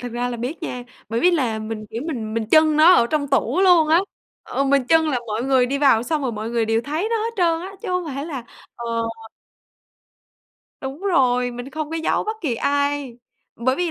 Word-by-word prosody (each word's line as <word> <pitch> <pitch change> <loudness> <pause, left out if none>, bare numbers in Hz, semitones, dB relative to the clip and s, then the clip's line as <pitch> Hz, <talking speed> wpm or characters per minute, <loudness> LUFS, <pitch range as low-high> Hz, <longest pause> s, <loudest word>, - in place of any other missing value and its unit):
thực 245 -1 -6
ra 245 +1 -2
là 240 - -4
biết 250 +9 -5
nha, 250 -6 -4 0.3
bởi 230 +1 -1
vì 360 - +5
là 255 -10 0
mình, 215 0 -6
kiểu, 230 +3 -4
mình 225 -8 -4
mình 230 - -1
chưng 310 -1 +5
nó 325 +4 +7
ở 235 - +4
trong 285 0 -1
tủ 280 +6 +1
luôn 350 -5 +5
á, 330 +2 +5 0.4
ờ, 275 - -2
mình 275 -1 +2
chưng 320 -1 +4
là 265 -5 0
mọi 220 +1 -2
người 260 -2 +3
đi 275 +2 -2
vào 265 -6 +4
xong 305 +3 -2
rồi 255 -3 -1
mọi 220 +1 -5
người 235 -1 +1
đều 225 +1 +1
thấy 310 - -2
nó 460 - +2
hết 450 +1 -2
trơn 335 -3 +2
á, 380 +2 -7
chứ 440 - -5
hông 360 -1 0
phải 280 +3 -4
là 270 -7 -6 0.3
ờ. 235 - -7 2.0
Đúng 270 +3 -6
rồi, 250 -10 +2
mình 245 +3 -8
không 310 0 -5
có 325 - -3
giấu 320 - 0
bất 435 +1 -3
kỳ 285 -9 -1
ai, 285 -1 -1 0.4
bởi 255 +3 0
vì 355 -2 -1
275 Hz, 230 wpm, -21 LUFS, 240-320 Hz, 2.0 s, nó